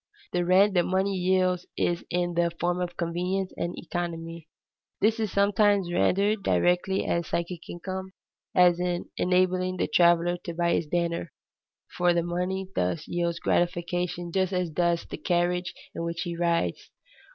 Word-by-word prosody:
_ - - -54
The 175 - +1
rent 190 +3 +5
that 175 -2 +3
money 190 +2 +1
yields 185 -1 +1
is 175 0 0
in 175 0 0
the 170 0 +2
form 175 +1 0
of 175 -1 -4
convenience 180 +3 -2
and 175 - -3
economy. 165 -2 -5 0.5
This 220 +2 +2
is 215 -3 -1
sometimes 200 -2 +3
rendered 200 +4 +2
directly 180 +1 +1
as 170 -1 -1
psychic 170 0 -4
income, 190 +2 -6 0.4
as 180 -1 +5
in 180 -1 -2
enabling 185 0 +1
the - - 0
traveler 175 0 +4
to 170 -1 -7
buy 170 0 +1
his 160 - 0
dinner, 170 -1 -1 0.7
for 175 -1 +4
the 170 - +2
money 180 +2 -2
thus 120 - -1
yields 170 -1 -1
gratification 175 0 -1
just 190 +1 0
as 180 -2 -1
does 170 +1 +1
the - - -7
carriage 175 0 0 0.2
in - - -4
which 170 0 -3
he 170 -1 -3
rides. 170 0 0
175 Hz, 160 wpm, -27 LUFS, 170-185 Hz, 0.7 s, rent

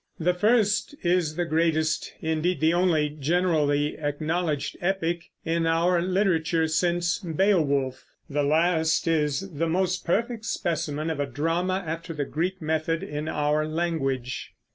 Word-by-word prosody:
The 175 +2 +2
first 215 +6 +2
is 175 -3 +1
the 175 +1 0
greatest, 160 -1 +1
indeed 160 +1 0
the 160 +2 +3
only 170 -4 +2
generally 150 -2 +1
acknowledged 155 +1 -1
epic 175 -2 -1 0.2
in 165 0 +1
our 170 +2 +2
literature 175 -3 +1
since 175 +2 +1
Beowulf; 155 -8 +1 0.2
the 145 0 -1
last 160 +2 +2
is 160 +3 0
the 165 +2 -1
most 185 +2 0
perfect 225 +5 -1
specimen 160 -5 -2
of 155 - -4
a 145 - 0
drama 170 +7 -1
after 165 +1 -5
the 145 -1 -2
Greek 180 +7 -2
method 160 +2 -1
in 150 -4 -4
our 150 0 0
language. 155 -6 -2
165 Hz, 135 wpm, -26 LUFS, 155-180 Hz, 0.2 s, the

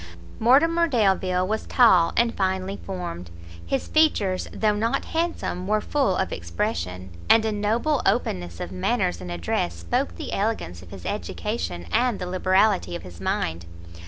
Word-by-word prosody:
Mortimer 330 +9 +4
Delvile 190 - +2
was 220 +2 -2
tall 185 -9 +5
and 235 0 +3
finely 190 0 -1
formed, 175 - -6 0.3
his 110 +11 -2
features, 210 -12 +2
though 215 -1 +1
not 225 +3 0
handsome, 325 - -2
were 215 +1 +2
full 265 -4 +1
of - - -1
expression, 85 +2 -3 0.2
and 225 -1 +6
a 220 - +1
noble 225 +8 0
openness 90 - -1
of 85 - -5
manners 90 -1 0
and 90 -1 -6
address 85 0 -1
spoke 85 0 -2
the - - -6
elegance 195 - -2
of 90 - -14
his 95 -2 -10
education, 85 +1 -3
and 245 - +2
the 180 - -4
liberality 185 +1 +2
of - - -6
his 90 -2 -11
mind. 85 +1 -2
185 Hz, 155 wpm, -24 LUFS, -, 0.3 s, and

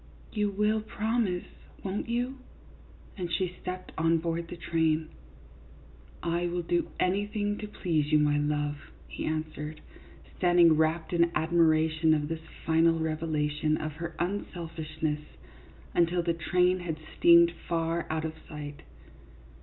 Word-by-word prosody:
You 210 -2 +1
will 210 +2 +1
promise, 215 -3 -1 0.4
won't 195 +3 -3
you? 245 +3 -1 0.4
" - - -23
and 175 -2 -3
she 180 -1 -1
stepped 185 0 -5
on 165 +1 +4
board 165 +1 -2
the 175 - -7
train. 160 -2 +1 0.6
" 70 -2 -23
I 175 0 0
will 175 0 -2
do 175 +1 0
anything 205 +2 0
to 210 - -5
please 160 -7 -1
you, 155 - +6
my 150 -1 +3
love," 145 0 -1 0.3
he - - -5
answered, 155 -1 -3 0.6
standing 175 -2 +5
wrapped 160 +2 +1
in 170 0 +4
admiration 160 -1 +3
of 150 0 -2
this 165 -1 -3 0.2
final 165 0 +4
revelation 155 -1 0
of 155 - -3
her 170 0 -5
unselfishness 160 -4 -3 0.7
until 175 +1 +2
the 170 0 +1
train 180 +2 +2
had 170 -3 -4 0.2
steamed 170 0 +7 0.2
far 165 0 0
out 160 0 -1
of 160 - -3 0.2
sight. 145 -2 -7
165 Hz, 140 wpm, -29 LUFS, 155-180 Hz, 0.7 s, steamed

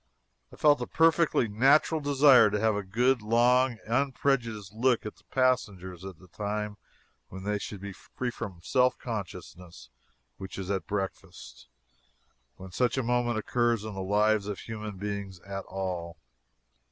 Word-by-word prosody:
I - - -12
felt 145 -3 +4
a 120 - -3
perfectly 165 -6 +3
natural 135 +8 +3
desire 140 -5 +6
to 105 0 -1
have 110 +1 +2
a 105 - -1
good, 120 +6 +1
long, 120 +3 +3
unprejudiced 120 -4 -1
look 120 +1 +1
at 105 - -7
the - - -24
passengers 100 -9 -1
at 95 -1 -8
a 95 - -17
time 105 +1 -4 0.5
when 95 0 -9
they 105 +1 -1
should 100 -1 -7
be 100 -1 -6
free 125 +5 -5
from 95 -7 -7
self 125 +6 +2
consciousness 90 - -8 0.5
which 95 -1 -8
is 95 0 -4
at 95 -1 -2
breakfast, 95 -9 -6 0.9
when 95 0 -11
such 125 +7 0
a 130 - +1
moment 120 -1 0
occurs 120 0 0
in 110 -1 -6
the 95 - -5
lives 105 +2 +2
of 105 -2 -5
human 105 -3 -7
beings 100 -2 -5
at 95 -1 -6
all. 90 -3 -5
105 Hz, 155 wpm, -28 LUFS, 95-125 Hz, 0.9 s, desire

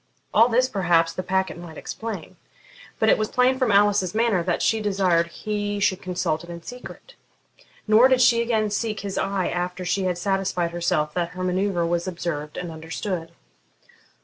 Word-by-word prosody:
All 230 +3 +6
this 250 +2 +3
perhaps 175 -6 +2
the 185 - -3
packet 190 -1 -1
might 165 -3 -10
explain; 225 -1 -6 0.6
but 220 - +1
it - - +4
was 215 - 0
plain 255 +1 +2
from 255 -4 +2
Alice's 200 -2 +3
manner 225 -5 +2
that 175 0 -1
she 225 -1 +2
desired 190 -5 +2
he 205 +2 -3
should 190 -1 +1
consult 175 -3 -2
it 175 - -12
in 170 -1 -8
secret. 250 - -10 0.7
Nor 220 +4 +7
did 260 -1 +3
she 235 -2 +5
again 220 -3 0
seek 215 0 -2
his 200 -1 -3
eye 195 -2 -1
after 180 +1 -3
she 185 +2 0
had 180 -2 0
satisfied 185 -2 -1
herself 170 -3 0
that 175 -1 -1
her 185 - -3
manoeuvre 185 -1 0
was 170 +1 -1
observed 170 -4 -4
and 180 -2 -5
understood. 165 +2 -5
190 Hz, 175 wpm, -24 LUFS, 175-215 Hz, 0.7 s, Nor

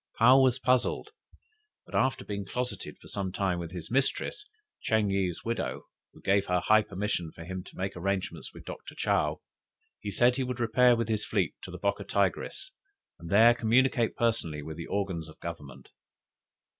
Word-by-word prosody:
'" - - -35
Paou 130 +4 +7
was 130 -1 +4
puzzled, 130 - +1 0.7
but - - -17
after 130 0 +1
being 100 -1 -3
closeted 125 0 -4
for - - -16
some 95 -2 -3
time 95 -2 0
with 85 -1 -5
his 90 -1 -7
mistress, 135 - 0 0.3
Ching 110 -3 +2
yih's 95 -3 -1
widow, 115 +1 -2 0.3
who - - -18
gave 100 0 +2
her 90 0 +2
high 110 +4 +5
permission 95 -5 -3
for 85 - -10
him 95 +1 -5
to - - -14
make 95 +1 -3
arrangements 95 +2 -2
with - - -13
Doctor - - -8
Chow, 75 0 0 0.6
he 105 - -5
said 120 +5 +3
he 135 - +1
would 125 -1 -4
repair 120 +2 +5
with 115 -2 -1
his 110 -2 0
fleet - - 0
to - - -8
the - - -7
Bocca - - -1
Tigris, - - -1 0.5
and 85 0 -9
there 115 +5 +7
communicate 120 0 +2
personally 85 -11 0
with 80 +1 -6
the 85 - -6
organs 95 -6 -2
of 80 - -15
Government. 85 -5 -8
100 Hz, 180 wpm, -29 LUFS, 90-120 Hz, 0.7 s, Paou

